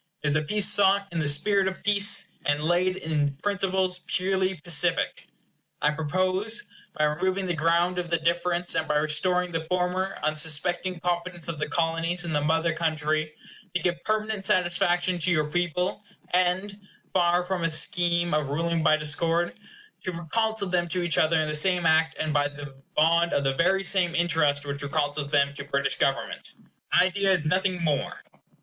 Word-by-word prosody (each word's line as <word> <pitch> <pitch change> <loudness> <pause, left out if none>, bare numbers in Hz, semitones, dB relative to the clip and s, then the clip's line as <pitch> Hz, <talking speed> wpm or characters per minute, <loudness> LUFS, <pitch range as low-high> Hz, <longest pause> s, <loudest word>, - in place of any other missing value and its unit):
It 150 -1 +1
is - - +4
peace 210 +2 +3
sought 200 0 +4
in 170 - -3
the 150 - 0
spirit 190 +7 +2
of 190 - -5
peace, 205 0 +2
and 145 0 0
laid 175 +3 +1
in 150 -5 -1
principles 190 -2 0
purely 190 0 0
pacific. 165 0 0 0.5
I 150 - +2
propose, 185 +8 -1 0.3
by 155 - +1
removing 185 +6 0
the 175 - -1
ground 170 +3 +1
of 175 -1 -4
the 170 - +1
difference, 175 +1 0
and 160 - -1
by 150 - 0
restoring 180 +4 +1
the 165 -1 -3
former 180 +2 -1
unsuspecting 160 +4 0
confidence 175 -1 -3
of 160 -3 -5
the 150 - -3
Colonies 165 +2 -1
in 165 - -3
the 150 - +1
Mother 160 +2 +1
Country, 155 -1 -1 0.4
to - - +2
give 175 0 -2
permanent 215 -1 -2
satisfaction 175 -1 +1
to 180 - +1
your 155 -3 +2
people; 180 +4 -1 0.3
and 185 +3 0 0.3
(far 175 -1 +2
from 180 -1 -3
a 165 - +1
scheme 175 +1 +1
of 150 -2 0
ruling 165 +3 -1
by 155 -1 +4
discord) 165 +3 0 0.5
to 185 - -3
reconcile 215 +5 -1
them 175 -1 0
to 180 +1 -2
each 170 -4 +1
other 160 +1 +3
in 155 - 0
the 150 - -3
same 175 +3 +3
act 160 0 +3
and 155 -1 -2
by 145 -1 +2
the 145 -1 -10 0.2
bond 170 +2 +3
of 140 - +1
the 135 0 +1
very 190 +7 +1
same 180 -2 +2
interest 150 -4 +1
which 140 0 -4
reconciles 145 0 -2
them 140 -1 +2
to 140 - -7
British 140 -1 -2
government. - - -2 0.4
My - - +5
idea 195 +1 +1
is 175 -5 +1
nothing 185 +1 0
more. 145 -4 -2
170 Hz, 175 wpm, -26 LUFS, 155-185 Hz, 0.5 s, My